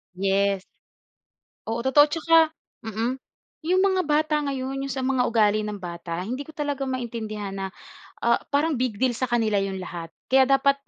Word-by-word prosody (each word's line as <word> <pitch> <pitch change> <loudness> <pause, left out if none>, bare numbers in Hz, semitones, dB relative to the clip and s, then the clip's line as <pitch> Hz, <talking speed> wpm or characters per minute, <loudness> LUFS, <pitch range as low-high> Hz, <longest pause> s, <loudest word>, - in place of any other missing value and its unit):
Yes. 195 0 +1 1.0
Oo, 230 +1 -2
totoo. 265 +3 +6
At - - -15
saka, 330 0 +4 0.5
mm, 230 +4 -2 0.5
yung 370 +2 +3
mga 380 -2 +3
bata 305 0 +2
ngayon, 270 0 -3
yung 275 - -3
sa 265 - -3
mga 255 -1 +2
ugali 215 -2 +2
ng 205 -2 -5
bata, 170 0 -5
hindi 255 +7 -4
ko 315 - -12
talaga 285 -2 -2
maintindihan 225 -5 -4
na, 195 0 -4 0.6
ah, 235 0 +3
parang 295 +3 +2
big 245 -5 -1
deal 255 -1 +2
sa 255 +1 -2
kanila 220 -4 +2
yung 195 -1 -3
lahat. 170 -2 -6 0.2
Kaya 265 0 +4
dapat 275 0 +4
245 Hz, 170 wpm, -25 LUFS, 205-275 Hz, 1.0 s, totoo